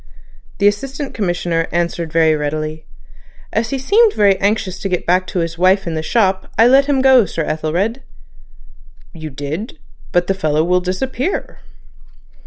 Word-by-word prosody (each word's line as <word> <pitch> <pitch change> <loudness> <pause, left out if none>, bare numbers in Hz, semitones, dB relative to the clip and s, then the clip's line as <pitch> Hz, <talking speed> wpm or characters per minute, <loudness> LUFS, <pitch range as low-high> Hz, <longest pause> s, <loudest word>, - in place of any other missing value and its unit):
The 200 - +3
Assistant 270 +7 -2
Commissioner 175 -4 -1
answered 170 -1 -2
very 160 -1 +3
readily: 155 +1 -4 0.7
"As 225 +2 0
he 275 - -2
seemed 420 - +3
very 200 -2 +4
anxious 200 -2 -1
to 195 - -3
get 180 -2 -2
back 185 +1 +2
to 195 - -5
his 165 0 -4
wife 190 +2 +3
in 170 - -3
the 155 - -2
shop 190 +1 0
I 225 - +6
let 270 +3 +5
him 275 -2 +1
go, 260 -6 +5
Sir 165 - -3
Ethelred." 175 - -2 1.1
"You 160 -2 -7
did? 150 - -6 0.3
But 175 0 +2
the 195 - 0
fellow 155 -4 0
will 180 +2 +2
disappear." 255 - -3
185 Hz, 160 wpm, -17 LUFS, 165-225 Hz, 1.1 s, I